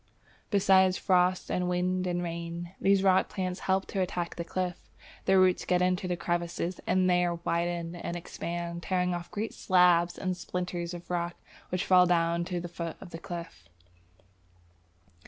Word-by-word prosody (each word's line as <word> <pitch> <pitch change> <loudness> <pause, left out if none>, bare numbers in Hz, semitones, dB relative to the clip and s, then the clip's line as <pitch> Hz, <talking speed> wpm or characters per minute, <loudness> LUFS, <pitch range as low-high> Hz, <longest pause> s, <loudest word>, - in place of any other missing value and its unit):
Besides 190 -2 +4
frost 180 -1 +2
and 180 0 0
wind 180 +1 0
and 175 0 -1
rain, 170 0 -5
these 195 0 +4
rock 190 -1 +4
plants 185 -2 -3
help 190 0 +2
to 195 - -1
attack 175 -1 -2
the 170 - -3
cliff. 180 +1 -4 0.4
Their 190 0 +5
roots 185 -1 +4
get 180 - +2
into 180 0 +1
the 180 -1 -1
crevices, 175 +1 -2
and 185 0 +3
there 180 -1 +2
widen 170 0 -2
and 175 0 -4
expand, 170 0 -5
tearing 180 0 0
off 175 0 -5
great 215 +2 -4
slabs 180 -2 +3
and 185 -1 -2
splinters 180 -1 -4
of 175 +1 -9
rock 175 0 -1 0.3
which 180 +1 -1
fall 180 -1 +6
down 170 0 +2
to 180 -1 -3
the 175 - -5
foot 170 -1 -6
of 175 - -11
the 165 - -7
cliff. 170 - -8
180 Hz, 165 wpm, -29 LUFS, 170-185 Hz, 0.4 s, fall